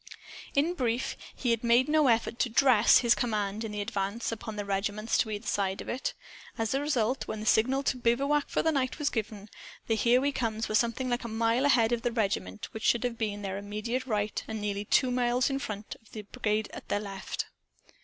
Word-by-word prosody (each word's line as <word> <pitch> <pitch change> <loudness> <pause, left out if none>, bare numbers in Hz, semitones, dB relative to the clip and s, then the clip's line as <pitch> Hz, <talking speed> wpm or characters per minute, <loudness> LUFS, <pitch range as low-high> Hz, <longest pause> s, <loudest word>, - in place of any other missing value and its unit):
In 305 +5 +2
brief, 245 -6 -1 0.2
he 245 - 0
had 230 0 0
made 235 +2 +4
no 305 -1 +4
effort 230 0 +1
to 245 - +2
"dress" 235 -2 +6
his 235 -1 +5
command, 215 -2 -1
in 220 - -4
the 210 0 -3
advance, 200 +3 -2
upon 225 -1 -6
the 205 -1 -4
regiments 205 +3 -1
to 220 - +1
either 210 +1 -5
side 195 -1 -1
of - - -7
it. 255 - -3 0.4
As 225 0 -1
a 270 - +1
result, 260 -4 0
when 215 - -4
the 215 - -6
signal 260 +6 +3
to 255 - 0
bivouac 275 +5 +1
for - - 0
the 320 - +3
night 265 -4 -1
was 295 -2 0
given, 215 -2 -4 0.4
the 225 - +1
"Here 235 +3 +4
We 285 +2 +1
Comes" 225 -4 -2
were - - -4
something 235 +4 +1
like 245 0 -1
a - - -4
mile 230 +3 +1
ahead 235 -5 +4
of 240 -1 0
the 240 - 0
regiment 195 - -2
which 220 - -6
should 235 - +3
have 245 -2 -2
been 205 -2 -2
at - - -9
their 195 0 -3
immediate 215 +6 -3
right, 210 -2 -1
and 220 -1 -4
nearly 205 0 -2
two 255 +4 +3
miles 250 +1 +1
in 270 - -1
front 210 -5 -6
of 225 - -23
the 215 - -6
brigade 215 -1 -1
at - - -9
their 205 - +1
left. 195 -2 -5
230 Hz, 225 wpm, -29 LUFS, 210-250 Hz, 0.4 s, dress